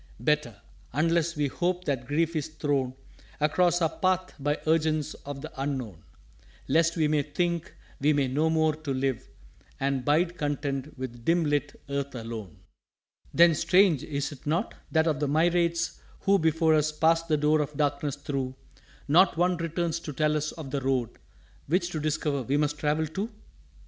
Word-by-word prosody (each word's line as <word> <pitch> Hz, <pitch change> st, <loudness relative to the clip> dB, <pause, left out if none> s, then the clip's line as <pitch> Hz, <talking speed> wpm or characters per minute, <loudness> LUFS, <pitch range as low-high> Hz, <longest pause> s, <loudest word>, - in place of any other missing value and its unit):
_" -, -, -11 dB
"Better 150 Hz, -7 st, +1 dB, 0.3 s
unless 165 Hz, +3 st, +1 dB
we 150 Hz, -1 st, +1 dB
hope 180 Hz, +5 st, -1 dB
that 130 Hz, -4 st, -2 dB
grief 165 Hz, +3 st, 0 dB
is 155 Hz, -1 st, -1 dB
thrown 145 Hz, -5 st, -1 dB, 0.4 s
Across 175 Hz, +3 st, +2 dB
our 160 Hz, -, +3 dB
Path 185 Hz, 0 st, +1 dB
by 145 Hz, +2 st, 0 dB
urgence 155 Hz, -1 st, +1 dB
of 140 Hz, -1 st, -5 dB
the 155 Hz, -, -6 dB
Unknown, 130 Hz, -, -3 dB, 0.7 s
Lest 165 Hz, +1 st, +2 dB
we 155 Hz, -2 st, +3 dB
may 150 Hz, -1 st, +2 dB
think 170 Hz, +3 st, -2 dB, 0.2 s
we 140 Hz, -, 0 dB
have 135 Hz, -2 st, 0 dB
no 155 Hz, +4 st, +2 dB
more 160 Hz, -1 st, +2 dB
to 150 Hz, -3 st, -4 dB
live 130 Hz, -2 st, -1 dB, 0.5 s
And 135 Hz, -1 st, 0 dB
bide 170 Hz, +5 st, +1 dB
content 145 Hz, -1 st, -2 dB
with 120 Hz, -2 st, -6 dB
dim 170 Hz, +3 st, +3 dB
lit 145 Hz, -1 st, -1 dB
Earth 140 Hz, -1 st, -3 dB
alone." 115 Hz, -7 st, -7 dB, 0.8 s
"_Then, 170 Hz, -1 st, +7 dB
strange, 180 Hz, -4 st, +4 dB
is't 145 Hz, 0 st, -4 dB
not? 160 Hz, +3 st, 0 dB, 0.2 s
that 160 Hz, -1 st, +3 dB
of 155 Hz, -3 st, +1 dB
the 145 Hz, -, 0 dB
myriads 170 Hz, +2 st, +1 dB, 0.2 s
who 200 Hz, 0 st, +3 dB
Before 160 Hz, 0 st, +3 dB
us 155 Hz, 0 st, +2 dB
passed 165 Hz, +2 st, +2 dB
the 155 Hz, -2 st, +2 dB
door 150 Hz, +1 st, +3 dB
of 150 Hz, -1 st, -4 dB
Darkness 145 Hz, -1 st, 0 dB
through 135 Hz, -2 st, -3 dB, 0.5 s
Not 165 Hz, +4 st, +5 dB
one 180 Hz, +1 st, +3 dB
returns 170 Hz, 0 st, -2 dB
to 155 Hz, -3 st, -7 dB
tell 150 Hz, +3 st, +1 dB
us 150 Hz, 0 st, -1 dB
of 150 Hz, -5 st, -8 dB
the 140 Hz, -1 st, -1 dB
Road, 130 Hz, -3 st, 0 dB, 0.6 s
Which 175 Hz, +3 st, +1 dB
to 155 Hz, -, -3 dB
discover 150 Hz, -2 st, -1 dB
we 135 Hz, +4 st, 0 dB
must 150 Hz, 0 st, 0 dB
travel 150 Hz, +1 st, +1 dB
too? 195 Hz, +8 st, -4 dB
150 Hz, 170 wpm, -27 LUFS, 140-165 Hz, 0.8 s, Then